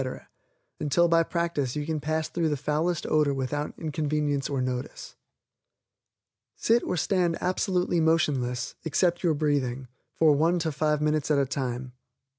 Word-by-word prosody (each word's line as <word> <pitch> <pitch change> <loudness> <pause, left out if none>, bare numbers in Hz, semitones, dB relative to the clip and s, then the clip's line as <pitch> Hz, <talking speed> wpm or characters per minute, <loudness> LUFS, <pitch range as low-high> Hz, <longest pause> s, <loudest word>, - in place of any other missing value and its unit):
until 155 +4 +3
by 165 0 +4
practice 165 -6 -1
you 150 -1 -2
can 155 0 -2
pass 155 +1 -1
through 165 -2 -1
the 145 - -1
foulest 155 +4 -1
odor 150 -2 +2
without 145 +3 -3
inconvenience 150 -2 -1
or 140 -2 -1
notice. 125 0 -4 1.4
Sit 235 +1 +2
or 180 - -2
stand 175 0 +1
absolutely 180 -1 0
motionless, 140 -7 +1
except 170 +2 +1
your 165 -4 +2
breathing, 135 -4 -1 0.3
for 160 -2 +5
one 165 +5 +2
to 160 -2 -1
five 150 0 0
minutes 155 -1 0
at 150 - +3
a 140 - +3
time. 130 -2 -3
150 Hz, 145 wpm, -27 LUFS, 140-165 Hz, 1.4 s, for